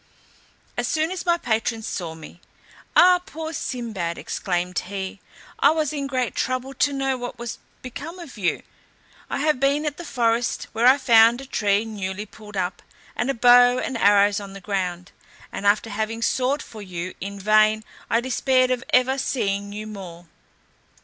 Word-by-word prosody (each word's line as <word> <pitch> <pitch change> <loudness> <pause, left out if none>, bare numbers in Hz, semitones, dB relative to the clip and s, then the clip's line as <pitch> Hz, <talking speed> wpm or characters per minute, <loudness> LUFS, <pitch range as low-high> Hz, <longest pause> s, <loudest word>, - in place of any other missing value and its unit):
As 245 0 0
soon 315 +4 0
as 370 -1 -5
my 345 0 +4
patron 225 -4 -1
saw 170 -6 -4
me; 160 +2 -13 0.5
"Ah, 360 0 +7
poor 320 -3 -6
Sinbad," 215 - -3
exclaimed 180 -1 -2
he, 195 +1 -6 0.4
"I 280 - +6
was 310 -1 0
in 280 -2 -3
great 255 -2 -1
trouble 255 +1 -2
to 285 +2 +2
know 270 -1 -1
what 245 0 -6
was 235 -1 -6 0.2
become 290 +7 -7
of 335 -7 -10
you. 190 -6 -1 0.7
I - - -2
have 300 -3 +2
been 280 +3 +2
at 295 -1 -2
the 345 - -7
forest, 235 -4 0
where 230 +2 +3
I 260 +2 +7
found 235 -2 +5
a 270 - -8
tree 210 -4 +1
newly 205 -2 -4
pulled 210 0 -11
up, 180 -1 -2 0.3
and 240 +4 -1
a 275 - 0
bow 245 +1 +6
and 260 - -3
arrows 205 -1 +4
on 200 -1 -9
the 195 - -8
ground, 180 -2 -3 0.4
and 200 - -3
after 210 +2 +2
having 220 +2 -3
sought 260 +5 +1
for 220 - -11
you 185 -2 -5
in 200 +1 -5
vain, 215 +2 +4 0.3
I 230 - +2
despaired 255 0 +2
of 250 0 -1
ever, 260 +2 +3
seeing 200 -6 -1
you 210 +1 -6
more. 185 -5 -9
230 Hz, 175 wpm, -23 LUFS, 200-265 Hz, 0.7 s, Ah